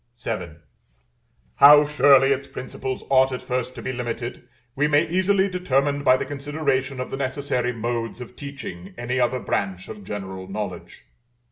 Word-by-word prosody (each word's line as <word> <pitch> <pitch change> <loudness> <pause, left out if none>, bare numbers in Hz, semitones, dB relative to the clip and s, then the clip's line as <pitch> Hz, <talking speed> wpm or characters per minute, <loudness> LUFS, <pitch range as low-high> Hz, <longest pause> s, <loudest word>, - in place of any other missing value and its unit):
VII. 85 -8 -4 1.0
How 145 +1 +9
surely 140 -2 +5
its 140 0 -1
principles 130 0 -6
ought 130 0 +5
at 125 - -5
first 125 0 -3
to - - -8
be 130 - -3
limited, 120 0 -5 0.3
we 145 +2 +2
may 150 +3 +3
easily 190 +3 +2
determine 145 -6 0
by 130 -1 +5
the - - -3
consideration 140 -2 -2
of 125 - -4
the - - -3
necessary 130 -2 -1
modes 115 0 -3
of 125 0 -9
teaching 115 -10 -8
any 120 +2 -2
other 125 +1 +2
branch 95 -6 -3
of 105 -2 -9
general 95 -2 -6
knowledge. 95 -3 -6
130 Hz, 155 wpm, -23 LUFS, 115-140 Hz, 1.0 s, How